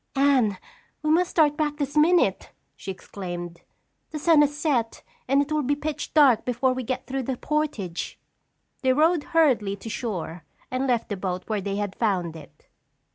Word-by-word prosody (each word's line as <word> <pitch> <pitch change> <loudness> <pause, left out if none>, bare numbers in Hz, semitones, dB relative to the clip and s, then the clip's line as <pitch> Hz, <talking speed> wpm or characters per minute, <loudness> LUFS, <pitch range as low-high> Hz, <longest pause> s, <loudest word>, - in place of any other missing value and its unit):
"Anne, 265 -8 +3 0.5
we 305 - +2
must 350 +3 +3
start 300 -3 +3
back 295 -1 -1
this 285 -1 -3
minute!" 305 - +3 0.3
she - - -9
exclaimed. 175 -2 -7 0.5
"The 310 - -5
sun 310 0 +5
has 295 0 +1
set 260 -8 -1 0.2
and 275 +2 +4
it 290 - -11
will 305 0 +1
be 285 +1 +1
pitch 295 +1 -5
dark 275 -7 +6
before 250 +1 +1
we 255 - -3
get 255 +1 -3
through 270 0 -3
the 255 0 -3
portage." 280 - -2 0.6
They 260 -1 +3
rowed 315 +2 +3
hurriedly 255 -12 +2
to 215 +3 -9
shore 180 -8 -4 0.3
and 255 +1 -1
left 240 -3 0
the 205 - -3
boat 185 -1 -3
where 215 -2 -2
they 200 +1 -3
had 205 -1 -2
found 185 -7 0
it. 150 -4 -14
255 Hz, 180 wpm, -25 LUFS, 200-295 Hz, 0.6 s, dark